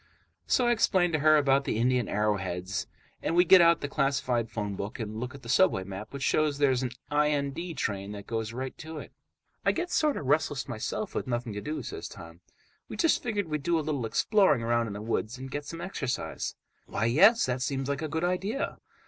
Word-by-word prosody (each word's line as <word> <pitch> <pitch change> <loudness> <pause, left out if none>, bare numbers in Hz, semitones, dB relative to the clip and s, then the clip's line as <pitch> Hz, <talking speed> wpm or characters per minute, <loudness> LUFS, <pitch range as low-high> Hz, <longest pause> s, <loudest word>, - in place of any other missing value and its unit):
So 250 - +3
I 240 - +4
explain 185 -6 +3
to 155 - +1
her 155 +1 +6
about 140 -1 +3
the - - -1
Indian 125 0 +1
arrowheads, 100 -2 -1 0.3
and 165 - -1
we 175 +1 +6
get 185 +1 +8
out 170 0 +5
the 145 - -2
classified 135 -5 0
phone 105 -3 -3
book 100 +7 -5
and 110 -1 -4
look 125 +3 -5
at 140 - -12
the - - -10
subway 120 - +3
map, 95 +2 -8
which 140 -1 -5
shows 150 -1 +2
there's 135 -3 +3
an 130 - -1 0.2
IND 150 +2 0
train 100 -3 -2
that 100 -1 -8
goes 110 -1 -3
right 130 +2 -5
to 160 0 -7
it. - - -8 0.5
"I - - +4
get 355 +1 -3
sort 305 -2 +2
of - - -5
restless 145 0 +1
myself, 130 - -4
with - - -3
nothing 120 -2 -2
to 105 - -5
do," 155 +5 -4
says 410 0 -6
Tom. - - -12 0.5
"We - - -6
just 330 -3 +3
figured 205 -6 -2
we'd 150 -1 -2
do 170 +4 +1
a - - +1
little 140 -7 -1
exploring 185 - +3
around 120 0 +1
in 105 - -5
the 105 +1 -6
woods 115 +1 -2
and 130 +1 -8
get 145 +1 -4
some 165 +3 -7
exercise." 140 -9 -3 0.3
"Why, 115 - -1
yes, 200 - +6
that 125 0 -2
seems 135 0 -1
like 140 0 -2
a 160 - -2
good 160 +2 -2
idea." 190 +8 -1
140 Hz, 220 wpm, -28 LUFS, 115-160 Hz, 0.5 s, get